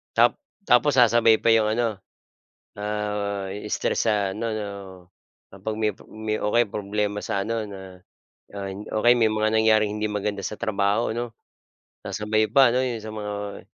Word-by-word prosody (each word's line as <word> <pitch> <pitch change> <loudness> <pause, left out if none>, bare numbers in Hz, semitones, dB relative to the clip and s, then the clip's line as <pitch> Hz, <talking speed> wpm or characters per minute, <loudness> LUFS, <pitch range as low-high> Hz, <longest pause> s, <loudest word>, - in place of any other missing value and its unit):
Ta - - +6 0.4
tapos 125 +4 +5
sasabay 115 -2 +5
pa - - -2
'yong 110 -1 +4
ano, 120 +1 +1 0.9
ah, 105 -1 -2 0.2
stress - - 0
sa 105 -3 +1
ano 115 +2 -3
'no, 105 -1 -3 0.8
kapag 100 +3 -5
may 110 -1 +2 0.2
may 110 0 -3
o 105 - -1
kaya 120 -1 +4
problema 105 0 -2
sa 100 - -1
ano 115 -1 -1
na 95 -2 -10 0.5
na - - -9 0.4
o - - +2
kaya 120 +1 +7
may 110 -2 +3
mga 110 0 +1
nangyaring 110 -1 +3
hindi 105 0 -1
maganda 105 -1 -3
sa 105 - -5
trabaho 105 0 0
ano. 120 0 -3 0.7
Sasabay 110 0 0
pa 135 -3 +6
'no 130 - +2
'yong 120 -4 -3
sa 110 - -6
mga 105 -1 -5
110 Hz, 160 wpm, -24 LUFS, 105-115 Hz, 0.9 s, kaya